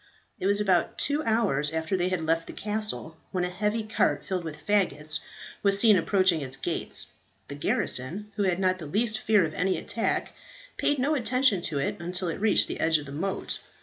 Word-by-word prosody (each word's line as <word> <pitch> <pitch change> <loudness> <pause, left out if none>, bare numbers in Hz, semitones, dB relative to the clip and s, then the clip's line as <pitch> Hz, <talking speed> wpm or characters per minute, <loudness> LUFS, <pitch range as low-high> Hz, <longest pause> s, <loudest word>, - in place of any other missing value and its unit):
It 185 - -1
was 200 +1 +2
about 190 -4 +1
two 295 +1 0
hours 205 -11 +1
after 160 +3 -1
they 180 0 0
had 185 -2 -1
left 165 +1 0
the - - -8
castle, 210 -6 -3
when 180 -1 -1
a 180 - -2
heavy 210 +4 -1
cart 215 +1 0
filled 185 -3 -2
with 155 -2 -8
faggots 180 -7 +1 0.4
was 200 -1 +3
seen 215 -1 +6
approaching 185 -2 +2
its 130 -2 -5
gates. - - +1 0.4
The - - -5
garrison, 145 +7 -1
who - - -2
had 185 -3 +1
not 185 -1 +1
the 155 - -7
least 215 +6 0
fear 210 -4 +3
of 155 - -5
any 185 +3 0
attack, - - -2 0.4
paid 290 - +1
no 275 +4 +1
attention 255 - +2
to 150 - -3
it 140 - -1
until 175 +1 -1
it 165 - -5
reached 220 -1 +4
the - - -5
edge 160 0 +3
of 150 - -7
the 140 - -9
moat. 185 +7 -3
185 Hz, 205 wpm, -27 LUFS, 160-210 Hz, 0.4 s, seen